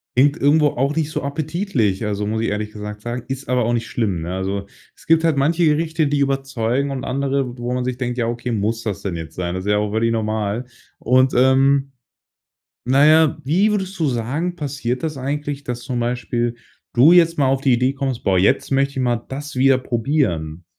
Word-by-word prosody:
Klingt 140 +5 +4
irgendwo 150 +1 +4
auch 140 +2 -1
nicht 155 -1 -1
so - - -2
appetitlich, 140 - -1
also, 105 0 -2
muss 110 +1 -1
ich 115 - 0
ehrlich 105 +1 -3
gesagt 105 0 -7
sagen. 120 +2 -4
Ist 135 0 -6
aber 125 -2 +2
auch 120 - 0
nicht 115 -1 -1
schlimm, 100 -8 -1
ne? 85 +2 -4
Also, 95 +1 -3 0.3
es - - -21
gibt 165 0 +4
halt 165 -2 +3
manche 160 +5 +2
Gerichte, 160 0 +1
die 145 0 0
überzeugen 135 -1 0
und 135 -2 -4
andere, 135 -2 -1
wo 120 +1 -3
man 125 - -1
sich 125 0 -3
denkt: 125 -1 -3
„Ja, 115 -2 0
okay, 120 +1 -3
muss 110 +2 -1
das 100 -3 -3
denn 95 -4 -3
jetzt 80 -1 -8
sein?“ 90 -1 -3
Das 95 +1 -5
ist 105 - +1
ja 105 - +3
auch 105 0 -1
völlig 115 +2 +1
normal. 110 +1 -2 0.3
Und, 130 +2 +3
ähm, 135 +2 +3 0.9
na 135 +3 +4
ja, 155 -1 +5
wie 190 +10 +3
würdest 195 -2 -2
du 160 - +1
sagen, 140 +9 -2
passiert 135 -5 -3
das 155 -2 -2
eigentlich, 145 +1 -4
dass 125 -2 -5
zum 125 0 -3
Beispiel 120 0 -1 0.4
du 140 +8 +6
jetzt 165 -2 +4
mal 140 - +3
auf 135 0 +1
die 135 - +2
Idee 125 +3 +2
kommst: 135 -3 -3
„Boah, 95 -1 +3
jetzt 95 - +2
möchte 135 0 +2
ich 130 - -2
mal 120 -2 +1
das 145 +2 -6
wieder 135 +1 +4
probieren?“ 110 - -1
130 Hz, 215 wpm, -20 LUFS, 115-145 Hz, 0.9 s, du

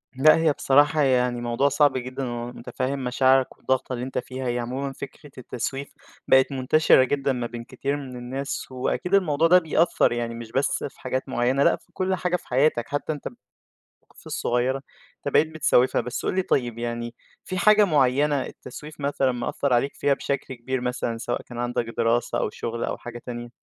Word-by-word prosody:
لأ 150 +4 +6
هي 160 -2 +3
بصراحة 145 +3 +3
يعني 125 -3 +2
موضوع 120 +4 +1
صعب 140 -1 +3
جدًا، 130 +2 -5
ومتفهّم 125 +3 -4
مشاعرك 130 +1 +2
والضغطة 130 0 -1
اللي 125 0 -3
أنت 130 - -5
فيها، 130 0 -4
هي 120 0 0
عمومًا 130 +3 -3
فكرة 140 +2 -10
التسويف 135 +2 -5 0.3
بقت 130 +1 +5
منتشرة 135 +1 +4
جدًا 135 +1 0
ما 120 -2 -3
بين 120 0 -7
كتير 140 +3 -3
من 135 -3 -8
الناس، 130 +3 -5
وأكيد 130 +8 -2
الموضوع 165 -5 +3
ده 180 +2 +7
بيأثر 165 0 +2
يعني 120 -1 -2
مش 115 -1 -8
بس 135 +3 0
في 135 - -25
حاجات 130 +1 -3
معيّنة، 130 +2 +2
لأ - - +4
في - - -22
كُلّ 185 0 0
حاجة 180 -1 -1
في - - -6
حياتك، 130 -2 +2
حتى 145 +2 -2
أنت 145 - -7
ب - - -7 0.7
المواقف - - -18
الصغيّرة 125 +2 0 0.4
أنت 140 - -5
بقيت 155 - +5
بتسوّفها، 135 -5 +2
بس 125 - -5
قُل - - 0
لي 190 - +3
طيب 120 -9 0
يعني 120 0 -4 0.3
في 185 - -4
حاجة 210 +3 +6
معيّنة 145 -2 +2
التسويف 150 0 -10
مثلًا 140 -2 +1
مأثّر 125 +2 -1
عليك 125 +4 +1
فيها 140 0 +2
بشكل 140 -1 -3
كبير 125 +2 -3
مثلًا، 125 -2 -2
سواء 120 +1 -3
كان 120 - -11
عندك 120 0 -1
دراسة 115 +1 +1
أو - - 0
شغل 115 +2 -4
أو - - -2
حاجة 120 0 -9
تانية؟ 120 -1 -6
130 Hz, 190 wpm, -24 LUFS, 120-145 Hz, 0.7 s, ده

